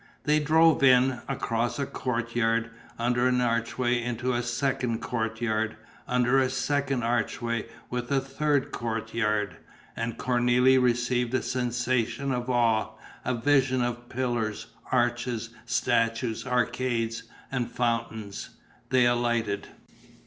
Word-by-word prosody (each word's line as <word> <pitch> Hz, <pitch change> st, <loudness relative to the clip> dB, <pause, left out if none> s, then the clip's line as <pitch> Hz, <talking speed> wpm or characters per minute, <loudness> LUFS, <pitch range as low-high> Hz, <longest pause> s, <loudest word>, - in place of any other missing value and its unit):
They 150 Hz, +1 st, +3 dB
drove 160 Hz, +1 st, +4 dB
in, 130 Hz, -1 st, +5 dB
across 120 Hz, -3 st, -1 dB
a 140 Hz, -, -1 dB
courtyard, 115 Hz, -2 st, -1 dB, 0.3 s
under 120 Hz, +1 st, +2 dB
an 125 Hz, 0 st, +2 dB
archway 120 Hz, +1 st, 0 dB
into 120 Hz, +1 st, -2 dB
a 120 Hz, -, 0 dB
second 120 Hz, -1 st, -1 dB
courtyard, 110 Hz, -1 st, -2 dB, 0.3 s
under 125 Hz, +1 st, +3 dB
a 130 Hz, -1 st, +2 dB
second 135 Hz, -1 st, 0 dB
archway 115 Hz, 0 st, -1 dB, 0.2 s
with 125 Hz, +1 st, -3 dB
a 140 Hz, -, +4 dB
third 135 Hz, +1 st, 0 dB
courtyard. 110 Hz, -4 st, -1 dB, 0.4 s
And 115 Hz, 0 st, -3 dB
Cornélie 125 Hz, +1 st, +3 dB
received 125 Hz, 0 st, +1 dB
a -, -, 0 dB
sensation 125 Hz, +1 st, -1 dB
of 125 Hz, 0 st, -2 dB
awe, 115 Hz, -3 st, +2 dB, 0.3 s
a 130 Hz, -, 0 dB
vision 130 Hz, 0 st, +2 dB
of 120 Hz, 0 st, -4 dB
pillars, 120 Hz, -4 st, -2 dB, 0.3 s
arches, 120 Hz, -2 st, 0 dB, 0.2 s
statues, 120 Hz, -1 st, 0 dB
arcades 120 Hz, -2 st, 0 dB, 0.3 s
and 125 Hz, -3 st, -1 dB
fountains. 115 Hz, -4 st, -2 dB, 0.4 s
They 125 Hz, -1 st, +4 dB
alighted. 120 Hz, -4 st, 0 dB
120 Hz, 115 wpm, -27 LUFS, 115-130 Hz, 0.4 s, in